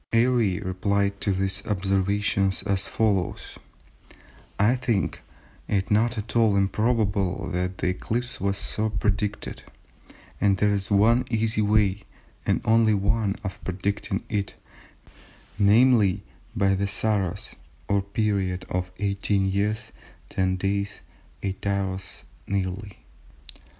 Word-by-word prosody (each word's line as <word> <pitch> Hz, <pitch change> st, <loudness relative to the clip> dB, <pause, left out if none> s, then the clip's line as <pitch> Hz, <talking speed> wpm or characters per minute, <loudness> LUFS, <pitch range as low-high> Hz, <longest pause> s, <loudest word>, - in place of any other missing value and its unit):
Airy 115 Hz, -5 st, +3 dB
replied 100 Hz, +1 st, -1 dB
to 100 Hz, -, +1 dB
these 95 Hz, +1 st, 0 dB
observations 100 Hz, 0 st, +1 dB
as 100 Hz, -1 st, 0 dB
follows:—"I 105 Hz, +2 st, -3 dB
think 120 Hz, -6 st, -1 dB, 0.5 s
it 100 Hz, -1 st, 0 dB
not 115 Hz, +3 st, +2 dB
at 105 Hz, +2 st, -5 dB
all 110 Hz, -3 st, +4 dB
improbable 100 Hz, -2 st, +1 dB
that 90 Hz, +1 st, -2 dB
the -, -, 0 dB
eclipse 120 Hz, +6 st, -3 dB
was 100 Hz, 0 st, 0 dB
so 110 Hz, +2 st, -1 dB
predicted, 105 Hz, 0 st, -2 dB, 0.8 s
and 100 Hz, -1 st, +3 dB
there 105 Hz, +1 st, +3 dB
is 100 Hz, -1 st, -2 dB
one 110 Hz, +5 st, +4 dB
easy 110 Hz, -1 st, +1 dB
way, 105 Hz, -2 st, +2 dB, 0.5 s
and -, -, +2 dB
only 110 Hz, -1 st, +4 dB
one 100 Hz, +1 st, +1 dB
of 95 Hz, -3 st, -6 dB
predicting 95 Hz, +2 st, -2 dB
it—namely, 105 Hz, +1 st, 0 dB, 0.3 s
by 100 Hz, -1 st, +3 dB
the 100 Hz, +1 st, 0 dB
Saros, 100 Hz, -3 st, -1 dB, 0.3 s
or 100 Hz, -1 st, +2 dB
period 100 Hz, -2 st, -1 dB
of 90 Hz, 0 st, -1 dB
18 100 Hz, -1 st, 0 dB
years, 105 Hz, +2 st, -1 dB, 0.4 s
10 95 Hz, -1 st, 0 dB
days, 100 Hz, +2 st, -2 dB, 0.4 s
8 95 Hz, 0 st, -3 dB
hours 95 Hz, -7 st, -2 dB, 0.2 s
nearly. 95 Hz, 0 st, -3 dB
100 Hz, 110 wpm, -25 LUFS, 95-105 Hz, 0.8 s, all